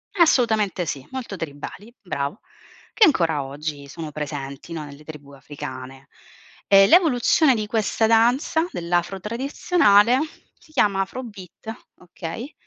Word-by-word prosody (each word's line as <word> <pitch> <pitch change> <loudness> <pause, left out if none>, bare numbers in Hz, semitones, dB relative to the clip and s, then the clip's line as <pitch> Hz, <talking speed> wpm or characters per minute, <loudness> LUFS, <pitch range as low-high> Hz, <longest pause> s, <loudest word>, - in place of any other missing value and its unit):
Assolutamente 220 - +2
sì, 140 -3 -5
molto 250 -7 -6
tribali, 165 +9 -8
bravo, 145 -1 -4 0.5
che 435 - +6
ancora 165 - +2
oggi 145 0 -6
sono 155 +1 -7
presenti, 145 +1 -6
no, 155 -2 -5
nelle 145 +1 -12
tribù 145 -3 -11
africane. 135 -1 -9 0.6
E 195 0 +7
l'evoluzione 310 -4 +4
di 215 -1 -2
questa 220 +1 0
danza, 245 +9 +2
dell'afro 175 +2 -1
tradizionale, 235 - +3 0.4
si 310 - -23
chiama 200 -7 +2
afro 250 +7 -5
beat, 210 0 -10 0.3
okay, 180 - -8
195 Hz, 125 wpm, -23 LUFS, 150-235 Hz, 0.6 s, E